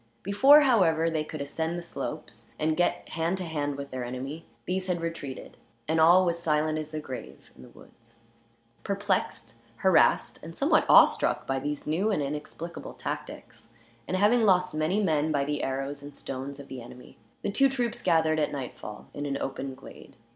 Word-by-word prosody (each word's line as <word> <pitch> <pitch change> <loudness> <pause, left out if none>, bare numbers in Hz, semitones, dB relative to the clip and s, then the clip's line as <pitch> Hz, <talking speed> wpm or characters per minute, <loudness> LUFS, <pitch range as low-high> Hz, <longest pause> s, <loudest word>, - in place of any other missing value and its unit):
Before, 265 +10 +7
however, 170 - +3
they 155 -1 0
could 155 -1 -7
ascend 160 +4 -3
the 175 - -5
slopes 170 - -7
and 155 0 +1
get 175 - 0
hand 165 +3 -1
to 185 - -4
hand 145 -4 -2
with 140 0 -7
their 130 -1 -4
enemy, 130 +6 -6 0.2
these 185 +1 -2
had 180 -2 0
retreated, 165 -5 -6 0.3
and 160 +1 +2
all 175 +3 +7
was 170 -1 0
silent 155 -1 +1
as 155 -1 -6
the 155 0 -4
grave 130 -4 -9
in - - -15
the - - -13
woods. 115 0 -19 0.7
Perplexed, 200 0 -2 0.2
harassed, - - +3
and - - -9
somewhat - - +3
awe - - +10
struck - - -1
by 135 0 -1
these 145 +1 -4
new 175 +8 0
and 175 -9 0
inexplicable 150 +4 -6
tactics; 115 - -7 0.3
and 185 - -1
having 210 +5 +4
lost 180 -4 +3
many 155 +6 0
men, 155 -3 +1
by 140 -2 +1
the 145 0 -2
arrows 135 +1 -3
and 145 0 -10
stones 135 +1 -6
of 140 - -10
the 130 -2 -7
enemy, 120 +1 -13 0.2
the - - -1
two 275 +6 +4
troops 245 -4 -2
gathered 160 -1 +2
at 150 - 0
nightfall 125 -6 -7
in 145 0 -4
an 140 -1 -2
open 135 -1 -4
glade. - - -14
155 Hz, 185 wpm, -28 LUFS, 140-180 Hz, 0.7 s, awe